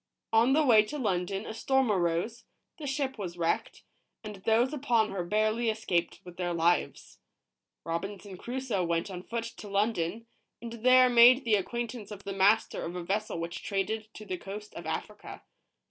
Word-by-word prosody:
On 230 Hz, +4 st, +5 dB
the 305 Hz, +1 st, +3 dB
way 225 Hz, -5 st, +7 dB
to 295 Hz, +7 st, -6 dB
London 195 Hz, -3 st, -1 dB
a -, -, -6 dB
storm 265 Hz, +1 st, +1 dB
arose, 180 Hz, +5 st, -1 dB, 0.3 s
the 295 Hz, -, -5 dB
ship 265 Hz, -2 st, -2 dB
was 175 Hz, -3 st, -5 dB
wrecked, 170 Hz, -1 st, -1 dB, 0.4 s
and 210 Hz, -2 st, -7 dB
those 230 Hz, +7 st, +2 dB
upon 240 Hz, -7 st, +1 dB
her 190 Hz, -2 st, -3 dB
barely 215 Hz, +5 st, +1 dB
escaped 210 Hz, -6 st, -1 dB
with 180 Hz, 0 st, -12 dB
their 175 Hz, -1 st, -2 dB
lives. 170 Hz, +1 st, 0 dB, 0.6 s
Robinson 195 Hz, +4 st, -5 dB
Crusoe 240 Hz, -2 st, -3 dB
went 170 Hz, +2 st, -1 dB
on 180 Hz, -1 st, -6 dB
foot 230 Hz, +4 st, -4 dB
to 230 Hz, -2 st, -9 dB
London, 200 Hz, 0 st, -1 dB, 0.3 s
and 235 Hz, -1 st, -7 dB
there 255 Hz, 0 st, +7 dB
made 245 Hz, +2 st, +7 dB
the 225 Hz, -, +2 dB
acquaint 235 Hz, +3 st, -1 dB
ance 220 Hz, -5 st, -9 dB
of 200 Hz, -2 st, -9 dB
the 195 Hz, -, -4 dB
master 200 Hz, +3 st, +3 dB
of 170 Hz, +2 st, -5 dB
a 180 Hz, -, -4 dB
vessel 200 Hz, 0 st, -2 dB
which 170 Hz, +1 st, -5 dB
traded 215 Hz, +2 st, -2 dB
to 215 Hz, -, -9 dB
the 185 Hz, -3 st, -4 dB
coast 210 Hz, +2 st, -8 dB
of -, -, -8 dB
Africa. -, -, -6 dB
215 Hz, 175 wpm, -29 LUFS, 185-235 Hz, 0.6 s, way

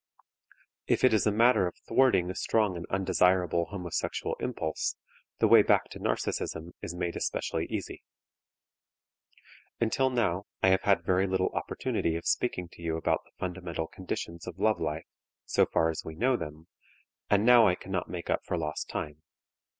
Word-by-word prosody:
If -, -, +1 dB
it 130 Hz, -, +6 dB
is 110 Hz, 0 st, +3 dB
a -, -, +4 dB
matter 110 Hz, -2 st, +4 dB
of 90 Hz, -, -6 dB
thwarting 110 Hz, -9 st, +3 dB
a -, -, -8 dB
strong 105 Hz, -5 st, +1 dB
and 85 Hz, 0 st, -6 dB
undesirable 90 Hz, -2 st, +2 dB
homosexual 90 Hz, -3 st, -3 dB
impulse, 80 Hz, -1 st, -2 dB, 0.4 s
the -, -, +3 dB
way -, -, +8 dB
back -, -, +2 dB
to -, -, -8 dB
narcism 80 Hz, +2 st, -2 dB
is 85 Hz, -, -5 dB
made 90 Hz, -1 st, -2 dB
especially -, -, -2 dB
easy. -, -, -5 dB, 1.8 s
Until 125 Hz, +3 st, +2 dB
now 105 Hz, -7 st, 0 dB, 0.2 s
I 95 Hz, -, +6 dB
have 95 Hz, 0 st, +4 dB
had 95 Hz, -4 st, +2 dB
very 95 Hz, +2 st, +2 dB
little 95 Hz, 0 st, 0 dB
opportunity 80 Hz, -, -2 dB
of 85 Hz, -, -5 dB
speaking 90 Hz, -1 st, 0 dB
to -, -, -15 dB
you 80 Hz, -1 st, -2 dB
about 80 Hz, -, +1 dB
the -, -, -25 dB
fundamental 90 Hz, -3 st, -4 dB
conditions 85 Hz, -1 st, -6 dB
of 90 Hz, -1 st, -7 dB
love 110 Hz, 0 st, +1 dB
life, 80 Hz, +1 st, -2 dB, 0.4 s
so -, -, +3 dB
far 80 Hz, 0 st, +2 dB
as 80 Hz, -, -5 dB
we 80 Hz, -, -7 dB
know 125 Hz, +8 st, +2 dB
them, 75 Hz, -6 st, -7 dB, 0.6 s
and 105 Hz, +1 st, +3 dB
now 120 Hz, -2 st, +7 dB
I 90 Hz, -, +3 dB
cannot 95 Hz, 0 st, -4 dB
make 90 Hz, -1 st, -4 dB
up -, -, +1 dB
for 90 Hz, -, -2 dB
lost 75 Hz, -2 st, -3 dB
time. 75 Hz, 0 st, -5 dB
90 Hz, 170 wpm, -29 LUFS, 85-100 Hz, 1.8 s, way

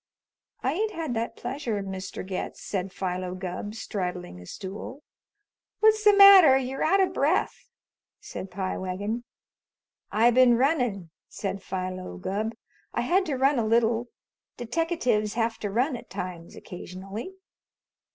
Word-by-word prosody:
"I 260 Hz, -, +1 dB
ain't 430 Hz, +5 st, -1 dB
had 320 Hz, -6 st, -3 dB
that 230 Hz, 0 st, -2 dB
pleasure, 245 Hz, -5 st, -3 dB
Mr. 190 Hz, -1 st, -6 dB
Getz," 190 Hz, -1 st, -4 dB
said 190 Hz, -1 st, -3 dB
Philo 185 Hz, -1 st, -3 dB
Gubb, 185 Hz, +3 st, -5 dB
straddling 180 Hz, -, -4 dB
a 90 Hz, -, -12 dB
stool. 210 Hz, +9 st, -7 dB, 0.8 s
"What's 435 Hz, 0 st, +4 dB
the 415 Hz, -1 st, +6 dB
matter? 385 Hz, -9 st, +9 dB
You're 265 Hz, 0 st, -2 dB
out 385 Hz, +5 st, +3 dB
of 370 Hz, -1 st, +1 dB
breath," 305 Hz, +5 st, 0 dB, 0.5 s
said 190 Hz, -, -7 dB
Pie 185 Hz, 0 st, -3 dB
Wagon. 205 Hz, +6 st, -3 dB, 0.9 s
"I 230 Hz, +3 st, +4 dB
been 245 Hz, -1 st, +5 dB
runnin'," 245 Hz, -, 0 dB, 0.2 s
said 195 Hz, -1 st, -4 dB
Philo 185 Hz, -, -5 dB
Gubb. 215 Hz, -, -3 dB, 0.4 s
"I -, -, +1 dB
had 365 Hz, +10 st, +2 dB
to 290 Hz, -, -1 dB
run 270 Hz, +1 st, +3 dB
a -, -, +1 dB
little. 230 Hz, +1 st, +2 dB, 0.5 s
Deteckatives 245 Hz, -5 st, 0 dB
have 225 Hz, -1 st, 0 dB
to 205 Hz, -, -3 dB
run 250 Hz, +7 st, +1 dB
at 240 Hz, -, -10 dB
times 180 Hz, -3 st, -6 dB
occasionally." 195 Hz, -, -8 dB
225 Hz, 140 wpm, -27 LUFS, 190-270 Hz, 0.9 s, matter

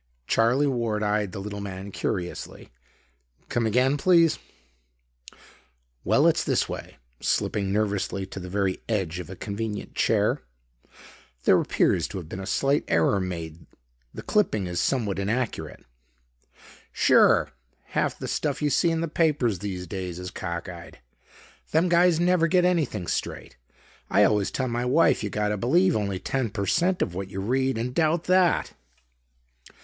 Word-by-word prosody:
Charlie 120 Hz, -, +2 dB
Ward 115 Hz, -6 st, -1 dB
eyed 105 Hz, -2 st, 0 dB
the -, -, -7 dB
little 100 Hz, +1 st, -5 dB
man 100 Hz, 0 st, -7 dB
curiously. 90 Hz, -, -4 dB, 0.8 s
"Come 115 Hz, -2 st, 0 dB
again, 130 Hz, +6 st, +2 dB
please?" 170 Hz, 0 st, +4 dB, 1.6 s
"Well, -, -, +3 dB
it's -, -, +3 dB
this -, -, +1 dB
way," -, -, -7 dB, 0.2 s
slipping 100 Hz, -2 st, 0 dB
nervously 100 Hz, -2 st, -1 dB
to 95 Hz, -, -8 dB
the 90 Hz, -1 st, -7 dB
very 95 Hz, -1 st, -1 dB
edge 95 Hz, -6 st, -1 dB
of 90 Hz, -, -7 dB
a 95 Hz, -, -7 dB
convenient 105 Hz, +2 st, -5 dB
chair. -, -, +1 dB, 1.0 s
"There -, -, +5 dB
appears -, -, +1 dB
to -, -, -7 dB
have 85 Hz, -4 st, -7 dB
been 95 Hz, -, -7 dB
a 95 Hz, -, -6 dB
slight 140 Hz, +7 st, +1 dB
error 85 Hz, +5 st, +2 dB
made. 85 Hz, -3 st, -6 dB, 0.4 s
The -, -, -9 dB
clipping 110 Hz, -, +1 dB
is 90 Hz, -1 st, -2 dB
somewhat 105 Hz, -8 st, 0 dB
inaccurate." 110 Hz, +4 st, -3 dB, 1.1 s
"Sure. -, -, +4 dB, 0.4 s
Half -, -, -1 dB
the -, -, -6 dB
stuff -, -, -1 dB
you 150 Hz, -1 st, 0 dB
see 170 Hz, -, +3 dB
in 165 Hz, 0 st, 0 dB
the 165 Hz, -, -1 dB
papers 150 Hz, -, +1 dB
these 95 Hz, -3 st, -5 dB
days 90 Hz, -1 st, -5 dB
is 90 Hz, 0 st, -6 dB
cockeyed. 85 Hz, -1 st, -6 dB, 0.7 s
Them 165 Hz, +3 st, +2 dB
guys 175 Hz, -1 st, +4 dB
never 175 Hz, -1 st, +3 dB
get 180 Hz, +1 st, +3 dB
anything 155 Hz, -, 0 dB
straight. -, -, -4 dB, 0.5 s
I 105 Hz, -, +4 dB
always 105 Hz, 0 st, +2 dB
tell 130 Hz, -, -2 dB
my 120 Hz, 0 st, -2 dB
wife 130 Hz, 0 st, +3 dB
you 105 Hz, -, -2 dB
gotta 105 Hz, +1 st, -1 dB
believe 170 Hz, -, +3 dB
only 100 Hz, -3 st, -1 dB
ten 130 Hz, +4 st, -2 dB
per 100 Hz, -1 st, -3 dB
cent 180 Hz, -, +2 dB
of 85 Hz, -, -4 dB
what 95 Hz, +1 st, -5 dB
you 95 Hz, 0 st, -6 dB
read 130 Hz, +5 st, 0 dB
and 120 Hz, +2 st, -3 dB
doubt 160 Hz, +2 st, +1 dB
that." 185 Hz, -1 st, +2 dB
105 Hz, 155 wpm, -25 LUFS, 95-145 Hz, 1.6 s, There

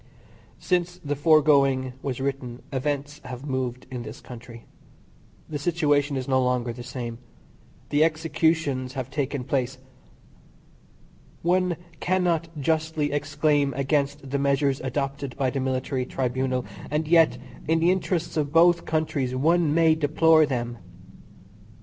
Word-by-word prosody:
Since 175 Hz, -1 st, -1 dB
the 145 Hz, 0 st, -1 dB
foregoing 140 Hz, -4 st, +4 dB
was 130 Hz, -3 st, -3 dB
written 130 Hz, -3 st, -4 dB
events 145 Hz, +2 st, -2 dB
have 130 Hz, +1 st, -7 dB
moved 130 Hz, -3 st, -3 dB
in 125 Hz, -2 st, -4 dB
this 110 Hz, 0 st, -8 dB
country. 120 Hz, -1 st, -11 dB, 0.8 s
The 150 Hz, -2 st, -4 dB
situation 145 Hz, -3 st, +1 dB
is 130 Hz, -, -4 dB
no 130 Hz, -1 st, +3 dB
longer 125 Hz, -1 st, 0 dB
the 120 Hz, -, -9 dB
same. 120 Hz, -2 st, -6 dB, 0.7 s
The 145 Hz, +1 st, +3 dB
executions 160 Hz, -4 st, 0 dB
have 130 Hz, -1 st, -5 dB
taken 140 Hz, -2 st, -2 dB
place. 130 Hz, 0 st, -1 dB, 1.7 s
One 180 Hz, 0 st, +2 dB, 0.2 s
cannot 175 Hz, -3 st, +1 dB
justly 155 Hz, 0 st, 0 dB
exclaim 145 Hz, -1 st, +1 dB
against 140 Hz, +1 st, 0 dB
the 140 Hz, +1 st, -1 dB
measures 140 Hz, 0 st, +1 dB
adopted 135 Hz, 0 st, -3 dB
by 135 Hz, -3 st, +1 dB
the 135 Hz, -, -2 dB
military 130 Hz, 0 st, -1 dB
tribunal, 130 Hz, 0 st, -1 dB, 0.2 s
and 150 Hz, +1 st, -1 dB
yet, 160 Hz, -6 st, +5 dB, 0.3 s
in 160 Hz, +1 st, +3 dB
the 170 Hz, +2 st, +4 dB
interests 180 Hz, -2 st, -1 dB
of 145 Hz, -2 st, 0 dB
both 170 Hz, +1 st, +5 dB
countries 145 Hz, -5 st, -1 dB
one 160 Hz, +3 st, +3 dB
may 165 Hz, 0 st, +5 dB
deplore 155 Hz, +1 st, +4 dB
them. 120 Hz, -3 st, -3 dB
140 Hz, 130 wpm, -25 LUFS, 130-160 Hz, 1.7 s, yet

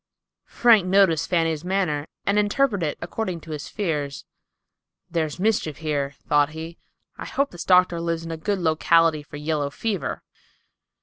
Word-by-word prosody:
Frank 225 Hz, -6 st, +4 dB
noticed 185 Hz, -5 st, +3 dB
Fanny's 165 Hz, -3 st, +1 dB
manner, 175 Hz, -6 st, -1 dB, 0.2 s
and 200 Hz, +1 st, +2 dB
interpreted 205 Hz, -, +1 dB
it -, -, -23 dB
according 180 Hz, -1 st, -3 dB
to 160 Hz, -, -10 dB
his 150 Hz, -2 st, -5 dB
fears. 150 Hz, -9 st, -3 dB, 0.9 s
"There's 160 Hz, -1 st, -2 dB
mischief 195 Hz, -7 st, 0 dB
here," 145 Hz, -3 st, -2 dB
thought 145 Hz, 0 st, +3 dB
he. 160 Hz, +1 st, -8 dB, 0.4 s
"I -, -, -5 dB
hope 280 Hz, +1 st, -1 dB
this 175 Hz, -, -7 dB
doctor 180 Hz, -2 st, +4 dB
lives 165 Hz, -1 st, -2 dB
in 165 Hz, -, -5 dB
a -, -, -3 dB
good 200 Hz, +6 st, -1 dB
locality 165 Hz, -1 st, +3 dB
for 145 Hz, 0 st, -10 dB
yellow 150 Hz, -1 st, -1 dB
fever." 200 Hz, +5 st, -3 dB
165 Hz, 150 wpm, -24 LUFS, 155-190 Hz, 0.9 s, Frank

